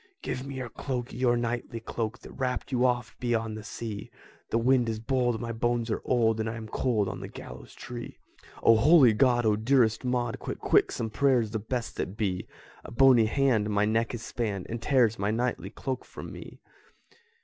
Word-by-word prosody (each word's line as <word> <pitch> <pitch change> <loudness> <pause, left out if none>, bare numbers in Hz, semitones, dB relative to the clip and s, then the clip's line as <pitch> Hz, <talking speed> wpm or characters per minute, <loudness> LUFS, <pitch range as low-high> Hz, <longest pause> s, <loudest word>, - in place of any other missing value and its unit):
"Give 125 - -3
me 140 - -6
your 130 -2 -5
cloak, 125 -2 -4
your 120 -1 +2
knightly 120 0 -3
cloak, 110 -1 -4
That - - -11
wrapped 130 0 -3
you 125 0 +3
oft 120 -5 -2
beyond 115 -3 -1
the 110 - -6
sea; 105 -1 -6 0.4
The - - +1
wind 125 0 +3
is 110 - -2
bold, 120 -1 0
my 115 -1 -4
bones 115 0 -1
are - - -1
old, 115 -3 +2
And 110 0 -1
I 115 - -4
am 110 -1 -7
cold 110 -3 0
on - - -5
the - - -6
gallows - - -11
tree." 120 -1 -8 0.5
"O 115 - +7
holy 135 -1 +6
God! 120 +1 +3
O 105 -1 +4
dearest 110 0 +2
Maud, 125 -2 -1
Quick, - - -5
quick, - - +3
some 110 -1 -3
prayers, 125 -4 +2
the 110 - -2
best 115 +3 -4
that 95 - -4
be! 95 -4 -2 0.4
A - - -9
bony 125 -2 +5
hand 115 -3 +2
my 105 0 +2
neck 115 +2 0
has 115 -2 -5
spanned, 105 -6 -3
And 115 0 -4
tears 120 -6 +3
my 100 +1 0
knightly 120 +3 -1
cloak 130 -3 -4
from - - -9
me!" - - -11
115 Hz, 200 wpm, -28 LUFS, 110-125 Hz, 0.5 s, O